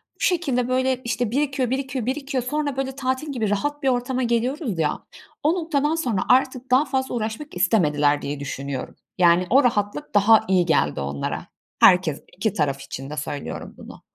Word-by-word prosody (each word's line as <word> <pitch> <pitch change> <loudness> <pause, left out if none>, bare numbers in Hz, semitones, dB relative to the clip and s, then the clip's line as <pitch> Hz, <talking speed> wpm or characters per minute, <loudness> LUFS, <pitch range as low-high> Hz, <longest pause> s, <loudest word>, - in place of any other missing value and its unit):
Bu - - -41
şekilde, 280 -10 +1
böyle, 255 0 0
işte, 240 -1 -1
birikiyor, 270 -2 0
birikiyor, 265 -2 -2
birikiyor. 270 0 -2
Sonra 290 +1 -2
böyle 270 -1 -2
tatil 265 +2 -2
gibi 225 -6 -1
rahat 290 +9 -2
bir 270 - +3
ortama 250 +1 0
geliyoruz 240 - -1
ya, 155 -2 -1 0.4
o 305 +3 +3
noktadan 315 -3 0
sonra 240 -12 -1
artık 255 0 +2
daha 265 +4 +5
fazla 265 -2 -2
uğraşmak 225 +5 -4
istemediler 150 -7 +2
diye 145 0 -4
düşünüyorum. 140 -1 -5 0.2
Yani, 175 0 +4
o 275 +4 +5
rahatlık 210 +2 -1
daha 220 +2 +6
iyi 185 -2 +3
geldi 145 - +1
onlara. 70 0 -4 0.3
Herkes, 180 -5 +5
iki 200 +1 0
taraf 140 -7 -1
için 135 0 -7
de 150 - -7
söylüyorum 145 -1 -5
bunu. - - -12
245 Hz, 170 wpm, -23 LUFS, 180-270 Hz, 0.4 s, daha